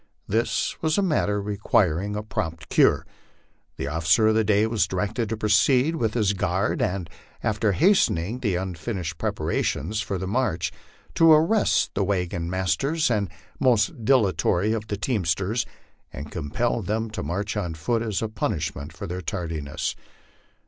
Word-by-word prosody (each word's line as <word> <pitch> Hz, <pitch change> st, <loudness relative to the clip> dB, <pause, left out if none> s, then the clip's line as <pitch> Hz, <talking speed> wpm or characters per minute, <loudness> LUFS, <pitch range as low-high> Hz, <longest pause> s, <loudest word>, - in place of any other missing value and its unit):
This 115 Hz, +4 st, 0 dB
was 155 Hz, -1 st, +1 dB
a 200 Hz, -, +3 dB
matter 105 Hz, -, +1 dB
requiring 100 Hz, -2 st, +1 dB
a 105 Hz, -, -3 dB
prompt 80 Hz, -6 st, -4 dB
cure. -, -, +4 dB, 0.7 s
The -, -, -3 dB
officer 80 Hz, +7 st, +2 dB
of -, -, +3 dB
the 110 Hz, 0 st, +3 dB
day 105 Hz, 0 st, +3 dB
was 110 Hz, -2 st, +1 dB
directed 105 Hz, +4 st, -2 dB
to 115 Hz, -, -2 dB
proceed 125 Hz, -, +3 dB
with 115 Hz, -7 st, -1 dB
his 105 Hz, -4 st, +2 dB
guard, 95 Hz, -, 0 dB
and, 90 Hz, -2 st, -1 dB, 0.4 s
after 105 Hz, -1 st, +1 dB
hastening 125 Hz, -, +2 dB
the 105 Hz, -8 st, 0 dB
unfinished 90 Hz, -2 st, -4 dB
preparations 105 Hz, +10 st, -1 dB
for 100 Hz, -2 st, -3 dB
the 95 Hz, -, -4 dB
march, 95 Hz, -, 0 dB, 0.4 s
to 165 Hz, -1 st, +6 dB
arrest 165 Hz, +8 st, +3 dB
the 100 Hz, -, 0 dB
wagon 90 Hz, -3 st, -1 dB
mas 95 Hz, -3 st, +1 dB
ters 155 Hz, -, 0 dB
and 100 Hz, -4 st, 0 dB, 0.3 s
most 115 Hz, -2 st, +2 dB
dilatory 105 Hz, -4 st, +2 dB
of 110 Hz, -1 st, -3 dB
the 105 Hz, -2 st, -3 dB
teamsters, 100 Hz, -, 0 dB, 0.4 s
and 75 Hz, +2 st, -8 dB
compel 90 Hz, +10 st, -1 dB
them 110 Hz, +3 st, -2 dB
to 110 Hz, -, -4 dB
march 100 Hz, +7 st, -3 dB
on 90 Hz, -6 st, -2 dB
foot 115 Hz, +8 st, -1 dB
as 110 Hz, -2 st, -2 dB
a -, -, 0 dB
punishment 80 Hz, -8 st, -3 dB
for 80 Hz, -, -7 dB
their 90 Hz, +2 st, -4 dB
tardiness. 85 Hz, -8 st, -3 dB
105 Hz, 155 wpm, -25 LUFS, 90-115 Hz, 0.7 s, to